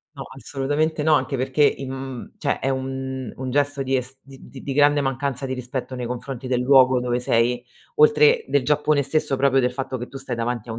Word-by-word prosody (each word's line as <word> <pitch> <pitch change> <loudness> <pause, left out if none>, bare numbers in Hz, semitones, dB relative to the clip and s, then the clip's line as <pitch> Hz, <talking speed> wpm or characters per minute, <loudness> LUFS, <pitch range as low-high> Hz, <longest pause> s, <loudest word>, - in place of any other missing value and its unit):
No, 135 - -6
assolutamente 145 +4 -1
no, 155 -1 +5
anche 135 0 0
perché 130 +3 0
in 135 -2 +1
mhmm, 130 -2 -7
cioè - - -1
è 135 - 0
un 130 -2 -4
un 130 0 -4
gesto 145 +1 0
di 135 - -1
es 130 +1 -5
di 135 -1 -13
di 140 - -4
grande 145 +1 +4
mancanza 135 0 -2
di 130 - -4
rispetto 125 +1 -5
nei 125 -1 -4
confronti 125 +1 -6
del 125 -1 +1
luogo 130 -1 +5
dove 125 0 -1
sei, 120 +1 +1 0.3
oltre 455 +1 +5
del 140 -3 +1
Giappone 150 0 +2
stesso 140 0 -1
proprio 135 0 +3
del 125 0 0
fatto 130 0 -4
che 120 - -6
tu 135 - -10
stai 135 -2 -5
davanti 115 0 -3
a - - -3
un 115 - -5
135 Hz, 215 wpm, -23 LUFS, 125-140 Hz, 0.3 s, no